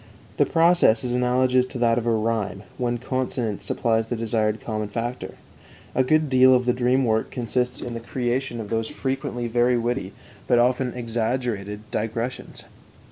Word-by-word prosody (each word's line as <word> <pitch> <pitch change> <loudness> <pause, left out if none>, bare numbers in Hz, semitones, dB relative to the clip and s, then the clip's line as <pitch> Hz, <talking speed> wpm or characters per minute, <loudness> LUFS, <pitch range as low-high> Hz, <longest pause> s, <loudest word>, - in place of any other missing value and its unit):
The - - +3
process 165 -9 +4
is 125 -1 -2
analogous 125 +1 +2
to 130 - -7
that 120 -1 +3
of 120 - -5
rhyme, 110 -4 0 0.2
when 120 -1 0
consonance 120 -5 -3
supplies 115 +1 0
the 120 - -2
desired 110 -1 0
common 110 -2 -3
factor. 120 +4 -4 0.6
A 130 - +3
good 155 +3 +2
deal 130 -1 +6
of 125 0 +1
the 125 - +3
dream 125 +1 +2
work 110 -1 +1
consists 125 +1 -1
in 120 - -5
the 115 - -4
creation 120 +1 -2
of 110 -1 -7
those 115 0 0
frequently 130 -2 -3
very 120 +1 +2
witty, 120 -5 -2 0.3
but 120 - +4
often 125 +1 +2
exaggerated, 115 -3 -2
digressions. 115 +3 -3
120 Hz, 160 wpm, -24 LUFS, 115-125 Hz, 0.6 s, deal